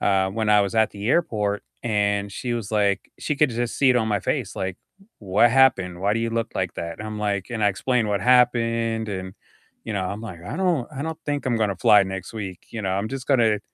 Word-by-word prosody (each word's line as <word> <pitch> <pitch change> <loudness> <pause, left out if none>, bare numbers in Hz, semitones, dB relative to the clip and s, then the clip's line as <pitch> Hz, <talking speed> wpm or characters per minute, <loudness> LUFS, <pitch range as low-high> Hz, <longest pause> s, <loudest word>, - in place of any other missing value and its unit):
uh, 95 -1 +2
when 110 +2 -2
I 105 0 +6
was 100 +1 -3
at 110 -1 +3
the 100 +2 -5
airport, 105 -10 +1 0.2
and 100 -3 0
she 120 +4 -3
was, 115 -4 -4
like 100 -2 +1
She 150 - -2
could 150 -1 +3
just 120 0 -2
see 135 -2 +5
it 125 - +3
on 110 -2 +1
my 105 -2 0
face, - - -2
like, 95 -1 -3 0.4
"What 105 +4 +3
happened? 105 -9 +3
Why 100 +2 +1
do 115 - 0
you 115 0 -1
look 115 0 -2
like 90 -2 -2
that?" 85 +4 -5
I'm 110 0 -5
like 100 -2 -1
and 115 -2 -3
I - - +5
explained 115 +3 0
what 100 -1 0
happened, 115 -2 +2
and, 95 -1 -5 0.5
you 110 - -4
know, 95 - -1
I'm, 100 +3 -4
like, 95 -7 -8
"I 145 - -6
don't 175 -10 0
I 135 - -4
don't 160 0 -4
think 145 -1 -2
I'm 120 -3 +1
gonna 105 -3 0
fly 105 +4 +6
next 95 -1 -6
week," 100 -5 -6
you 115 - -5
know? 95 - -1
"I'm 100 +3 -1
just 135 0 -6
gonna 115 -6 +3
110 Hz, 240 wpm, -23 LUFS, 100-120 Hz, 0.5 s, I